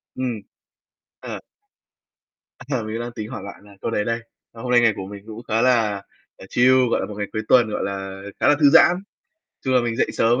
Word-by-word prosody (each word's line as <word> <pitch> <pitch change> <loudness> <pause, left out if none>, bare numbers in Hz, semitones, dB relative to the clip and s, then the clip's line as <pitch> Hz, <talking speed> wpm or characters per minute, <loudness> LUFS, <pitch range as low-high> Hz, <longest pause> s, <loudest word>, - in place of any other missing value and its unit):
Ừm. 125 -5 -3 0.8
Ờ. - - -6 1.3
Ờ, 130 -5 -1
mình 110 +1 -4
đang 120 0 -4
tính 110 -2 -6
hỏi - - -6
bạn 100 0 -10
là 100 -1 -16
câu - - -2
đấy 105 -2 0
đây. 115 0 -1 0.3
Ờ, 115 - -11
hôm 125 - -3
nay 120 - +6
ngày 115 -2 +4
của 95 - -6
mình 100 0 -9
cũng 110 +2 -8
khá 115 0 +1
là, 110 -6 +2 0.4
ờ, 95 - -12
chill, 130 +1 +4
gọi - - +2
là, - - -2
một 105 - -8
ngày 105 -1 -3
cuối 110 - -1
tuần, 120 -4 +5
gọi - - -2
là, 95 0 -5 0.2
khá - - +2
là 145 - +6
thư 145 -2 +7
giãn. 175 - +7 0.7
Chung 130 - +1
là 125 - +5
mình 120 -1 -2
dậy - - +2
sớm 120 +3 +2
115 Hz, 230 wpm, -22 LUFS, 105-125 Hz, 1.3 s, thư